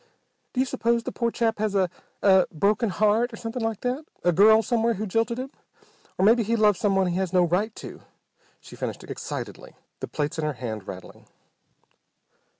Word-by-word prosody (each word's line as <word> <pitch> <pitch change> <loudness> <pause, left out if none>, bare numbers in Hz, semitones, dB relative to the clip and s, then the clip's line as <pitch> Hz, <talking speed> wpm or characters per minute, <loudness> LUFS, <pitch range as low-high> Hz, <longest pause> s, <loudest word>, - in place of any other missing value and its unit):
"Do 250 - -2
you 260 - +3
suppose 235 -2 0
the - - -4
poor 235 -1 -1
chap 225 -2 -1
has 215 -1 -1
a 190 -2 +3 0.4
a 190 -2 +5
broken 205 +7 +1
heart, 215 +5 +2
or - - -7
something 230 +2 -5
like 225 -2 -2
that? 250 +5 -2 0.2
A 175 - +4
girl 220 +5 +6
somewhere 230 0 +1
who 210 +3 -3
jilted 225 +4 0
him? 260 +2 -5 0.7
Or 190 - +2
maybe 230 +3 +5
he 230 +2 0
loves 210 -3 +3
someone 195 -2 +2
he 180 0 -1
has 190 -2 -1
no 180 -1 +4
right 180 +6 0
to!" - - -9 0.6
she - - -13
finished - - -5
excitedly, - - -7 0.2
the - - -5
plates 150 +2 -3
in - - -1
her 150 -1 -1
hand 110 -5 -6
rattling. 95 0 -10
215 Hz, 190 wpm, -25 LUFS, 185-230 Hz, 0.7 s, girl